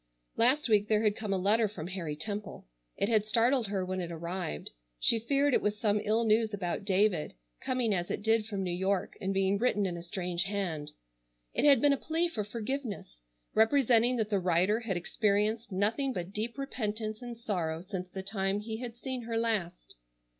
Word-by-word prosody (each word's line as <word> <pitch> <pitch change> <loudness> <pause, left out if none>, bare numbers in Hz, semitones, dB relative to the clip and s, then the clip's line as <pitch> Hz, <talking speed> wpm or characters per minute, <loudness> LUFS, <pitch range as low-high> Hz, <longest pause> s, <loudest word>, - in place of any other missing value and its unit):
Last 260 +6 +4
week 210 -2 +3
there 215 0 +2
had 210 -1 +2
come 215 -3 -4
a 195 - +2
letter 210 +4 +3
from 185 -6 -7
Harry 175 -5 -4
Temple. 205 +6 -5 0.3
It - - +1
had 215 -2 +3
startled 230 +3 +2
her 195 -2 -1
when 185 0 -2
it 170 -1 -5
arrived. 170 - -4 0.3
She 230 - +3
feared 275 +4 +2
it - - +4
was 210 0 0
some 210 -2 +2
ill 220 +2 +2
news 220 -1 +3
about 190 0 -3
David, 195 - +2 0.3
coming 250 -4 +1
as 175 -2 -1
it - - -3
did 225 0 +2
from 200 -3 -3
New 180 -2 -2
York 190 +2 -1
and 190 - -1
being 195 +1 +1
written 210 -4 +2
in 180 -2 -2
a - - -6
strange 175 0 -2
hand. 185 -7 -3 0.6
It - - +1
had 280 -5 +7
been 290 -1 +5
a - - 0
plea 325 +5 0
for 220 -10 -3
forgiveness, 215 - -5 0.3
representing 240 +1 +4
that 220 -2 -1
the 200 - +3
writer 185 +4 +2
had 220 -6 -2
experienced 210 +4 0
nothing 225 +8 0
but 180 -1 -5
deep 225 +4 -2
repentance 215 -5 -3
and 240 -1 -7
sorrow 170 -8 -2
since 185 -1 -6
the 190 +1 -6
time 195 0 -1
he 220 +1 -5
had 240 -1 -7
seen 255 -1 -5
her 230 -1 -2
last. 210 -7 -2
210 Hz, 195 wpm, -30 LUFS, 190-230 Hz, 0.6 s, had